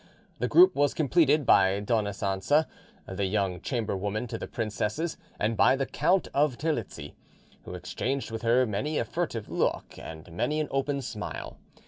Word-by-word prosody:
The - - 0
group 360 +2 +6
was 145 0 +2
completed 150 -1 +3
by 95 -2 +5
Dona 105 0 0
Cancha, 100 +10 +1 0.4
the 95 +1 -2
young 95 -3 -1
chamberwoman 105 -2 -2
to - - -4
the - - -5
princesses, 110 - -2 0.2
and 110 +2 0
by 130 - +5
the 135 0 -1
Count 185 +6 +1
of 140 -3 +2
Terlizzi, 150 - -3 0.5
who 90 - -7
exchanged 120 +9 -3
with 115 - -4
her 120 +2 +3
many 125 +8 -2
a - - 0
furtive 150 -11 -3
look - - -2
and 80 +2 -9
many 150 - -1
an 155 - -2
open 135 0 -1
smile. 110 -4 -6
115 Hz, 160 wpm, -28 LUFS, 100-145 Hz, 0.5 s, group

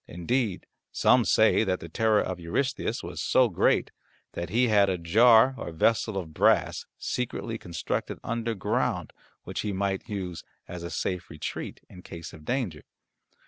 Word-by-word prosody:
Indeed 105 +4 -1 0.3
some - - +4
say - - +4
that 95 -3 0
the 85 - -8
terror 110 +5 +2
of 95 -1 -4
Eurystheus 130 +12 -2
was - - -5
so - - +3
great - - +2 0.4
that 85 -1 -5
he 120 +5 +3
had 100 -3 +4
a 95 - 0
jar 115 +9 +5
or - - -5
vessel 110 +5 +1
of 85 -5 -5
brass - - +2
secretly 115 -2 -3
constructed 85 -3 -3
underground 115 -3 -1 0.3
which - - -5
he 105 -2 -2
might 95 0 -2
use 90 -5 -4 0.2
as 90 -1 -7
a 85 - -5
safe 90 -1 -3
retreat 75 -2 -6
in 90 - -13
case 85 -2 -9
of 75 -2 -13
danger. 115 - -2
95 Hz, 155 wpm, -27 LUFS, 85-115 Hz, 0.4 s, jar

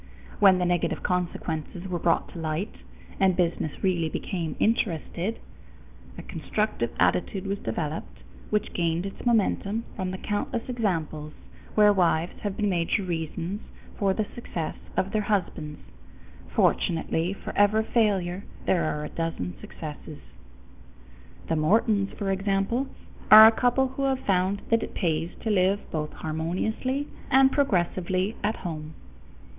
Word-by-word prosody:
When 195 -2 +7
the 180 - +1
negative 175 -1 0
consequences 175 -1 -2
were 180 -2 -2
brought 165 0 +1
to 170 - -9
light, 160 +6 -2 0.5
and 190 -2 +4
business 170 -3 -1
really 175 -4 +1
became 165 -1 -3
interested, 205 -1 0 0.8
a - - -7
constructive 210 - -2
attitude 90 - +1
was 200 +1 -2
developed 150 - -4 0.3
which 210 0 0
gained 170 +1 0
its 195 - -7
momentum 220 -1 +1
from 185 -2 -2
the 185 - -4
countless 210 +4 -2
examples 165 -10 -2 0.4
where 210 -1 +6
wives 175 -3 +1
have 205 -2 -3
been 210 - +1
major 180 +2 +1
reasons 170 +3 -3 0.3
for 195 -2 +1
the 215 +2 0
success 170 -9 -4 0.2
of 195 - +1
their 215 0 +1
husbands. 180 -7 -2 0.7
Fortunately 165 +1 +1
for - - -8
every 205 +2 +4
failure 200 -5 +1 0.2
there 170 -4 +2
are 150 -1 -2
a - - -6
dozen 165 - -3
successes. 150 -1 -8 1.3
The 165 - +1
Mortons, 200 +5 +2
for 200 -2 -1
example, 195 +6 0 0.4
are 215 0 +12
a 220 - +9
couple 250 +3 +2
who 275 +1 -2
have 265 -1 +1
found 195 +1 +1
that 230 0 +4
it - - -6
pays 165 -3 0
to 220 - -1
live 195 0 +3
both 150 -1 -2
harmoniously 190 - -2 0.2
and 265 +1 +6
progressively 185 - +1
at 215 +2 +1
home. 155 -2 -5
185 Hz, 140 wpm, -26 LUFS, 165-210 Hz, 1.3 s, are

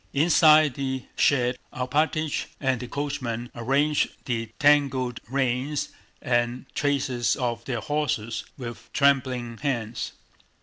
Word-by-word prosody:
Inside 155 -1 +6
the 130 -1 -3
shed 125 -3 +2
Alpátych 150 +4 0
and 130 -3 0
the 125 - -6
coachman 125 -4 -3
arranged 140 +5 +1 0.2
the 115 -2 -2
tangled 135 -5 +3
reins 135 +2 0 0.3
and 120 +1 0
traces 130 -4 +1
of 120 -3 -2
their 120 -4 -2
horses 130 -8 -1
with 120 -3 -8
trembling 130 -4 +1
hands. 120 -5 -2
130 Hz, 105 wpm, -25 LUFS, 120-145 Hz, 0.3 s, Inside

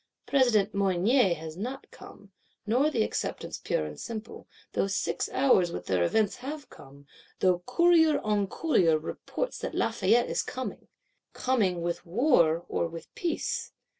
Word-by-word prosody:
President 225 -7 +3
Mounier 195 +2 +3
has 160 0 -8
not 250 +9 -5
come, 200 -1 -14 0.3
nor 250 +8 +2
the 230 -8 +1
Acceptance - - -4
pure 75 - 0
and 75 -1 -8
simple; 225 -1 -7 0.3
though - - +1
six 195 - -1
hours 190 -11 +3
with 90 - -6
their 90 -2 +1
events 210 - +1
have 285 +3 -7
come; 140 +1 -15 0.3
though 180 -2 +3
courier 320 +2 +4
on 210 -2 0
courier 185 - +2
reports - - -5
that - - -5
Lafayette 240 +1 +2
is - - 0
coming. 260 0 -6 0.5
Coming, 200 -10 0
with 170 0 -2
war 170 - +2
or - - -1
with 165 -1 -10
peace? 340 -3 -3
205 Hz, 145 wpm, -28 LUFS, 170-260 Hz, 0.5 s, courier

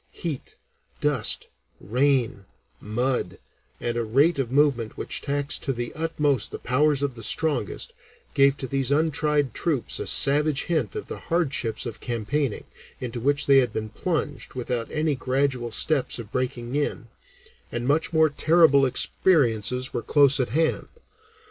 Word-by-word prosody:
Heat, 155 -6 -6 0.4
dust, 145 -7 +1 0.3
rain, 125 -3 0 0.3
mud, 120 -3 -2 0.4
and 120 -1 -3
a 120 - 0
rate 140 +8 +2
of 125 -3 -2
movement 135 -5 +1
which - - -1
taxed 145 0 -1
to 135 - -2
the 120 -1 -5
utmost 150 -4 0
the - - -6
powers 145 +3 +1
of 140 -2 -1
the 115 - -11
strongest, 145 0 +1 0.4
gave 140 0 +4
to 130 - -5
these 135 0 0
untried 150 -3 +1
troops 150 -8 -1
a - - -4
savage 145 0 +3
hint 155 - -2
of - - -5
the - - -7
hardships 140 -10 0
of 115 -2 -6
campaigning, 120 +2 -2 0.4
into 120 -1 -5
which 145 +4 +1
they 140 -1 +6
had 125 -4 0
been 110 0 -4
plunged 145 +2 -4
without 125 -2 -3
any 155 -1 0
gradual 130 -2 -1
steps 145 +1 +1
of 115 -3 -9
breaking 125 0 -3
in, 145 -4 -2 0.6
and 120 +1 -3
much 155 +5 +1
more 160 -2 +3
terrible 155 -3 +4
experiences 125 - +1
were 120 - -2
close 140 +1 +3
at 125 - 0
hand. 160 +6 0
135 Hz, 150 wpm, -24 LUFS, 120-150 Hz, 0.6 s, they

